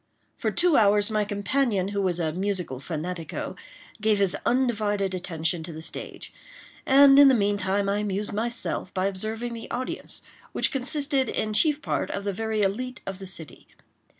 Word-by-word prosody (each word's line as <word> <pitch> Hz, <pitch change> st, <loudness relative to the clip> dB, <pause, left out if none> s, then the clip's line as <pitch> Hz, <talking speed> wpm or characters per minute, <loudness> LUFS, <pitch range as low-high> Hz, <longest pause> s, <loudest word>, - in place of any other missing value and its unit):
For -, -, -1 dB
two 345 Hz, -3 st, +3 dB
hours 205 Hz, 0 st, +4 dB
my 215 Hz, -1 st, +2 dB
companion, 205 Hz, -1 st, 0 dB
who 200 Hz, 0 st, -1 dB
was 180 Hz, -2 st, 0 dB
a 160 Hz, -2 st, -1 dB
musical 185 Hz, -7 st, -2 dB
fanatico, 165 Hz, +2 st, -5 dB, 0.5 s
gave 215 Hz, 0 st, +3 dB
his 195 Hz, -2 st, +2 dB
undivided 210 Hz, -6 st, +1 dB
attention 165 Hz, -2 st, -2 dB
to 165 Hz, +2 st, -6 dB
the 160 Hz, 0 st, -8 dB
stage; -, -, -7 dB, 0.5 s
and, 275 Hz, +1 st, +8 dB
in 285 Hz, -, +9 dB
the 265 Hz, -, +6 dB
meantime, 200 Hz, -1 st, +1 dB
I 200 Hz, +1 st, +1 dB
amused 205 Hz, 0 st, -2 dB
myself 230 Hz, -3 st, -2 dB
by 185 Hz, 0 st, +1 dB
observing 220 Hz, +5 st, -3 dB
the 230 Hz, -1 st, -8 dB
audience, 255 Hz, +1 st, -4 dB, 0.3 s
which -, -, +1 dB
consisted, 275 Hz, -1 st, 0 dB
in 215 Hz, 0 st, -2 dB
chief 300 Hz, +6 st, +2 dB
part, -, -, -1 dB
of 200 Hz, -, -4 dB
the 200 Hz, -1 st, -2 dB
very 220 Hz, +1 st, -1 dB
elite 250 Hz, +6 st, -2 dB
of 195 Hz, -1 st, -5 dB
the 190 Hz, -, -7 dB
city. 160 Hz, -7 st, -10 dB
205 Hz, 170 wpm, -26 LUFS, 190-235 Hz, 0.5 s, in